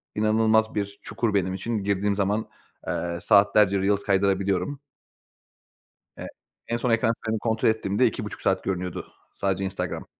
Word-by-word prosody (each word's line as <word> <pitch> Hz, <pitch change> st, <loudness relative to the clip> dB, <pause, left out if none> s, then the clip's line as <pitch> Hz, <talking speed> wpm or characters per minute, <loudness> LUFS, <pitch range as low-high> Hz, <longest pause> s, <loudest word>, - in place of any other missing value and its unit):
inanılmaz 110 Hz, +1 st, +2 dB
bir 100 Hz, -1 st, -3 dB
çukur 110 Hz, +1 st, -1 dB
benim 95 Hz, -2 st, +1 dB
için. 105 Hz, +2 st, -3 dB
Girdiğim 100 Hz, 0 st, 0 dB
zaman, 100 Hz, +2 st, -1 dB, 0.4 s
eee, 85 Hz, 0 st, -2 dB
saatlerce 100 Hz, -1 st, +4 dB
reels 100 Hz, +1 st, +1 dB
kaydırabiliyorum. 100 Hz, +5 st, 0 dB, 1.4 s
E -, -, -6 dB, 0.4 s
en 115 Hz, -, 0 dB
son 125 Hz, +1 st, -1 dB
ekran 115 Hz, 0 st, +2 dB
kaydımı 110 Hz, 0 st, -2 dB
kontrol 110 Hz, 0 st, +1 dB
ettiğimde 110 Hz, +2 st, +2 dB
2,5 110 Hz, -2 st, -4 dB
saat 95 Hz, -1 st, 0 dB
görünüyordu, 90 Hz, -2 st, -4 dB, 0.2 s
sadece 95 Hz, 0 st, -1 dB
Instagram. 90 Hz, -2 st, -4 dB
100 Hz, 135 wpm, -25 LUFS, 95-110 Hz, 1.4 s, saatlerce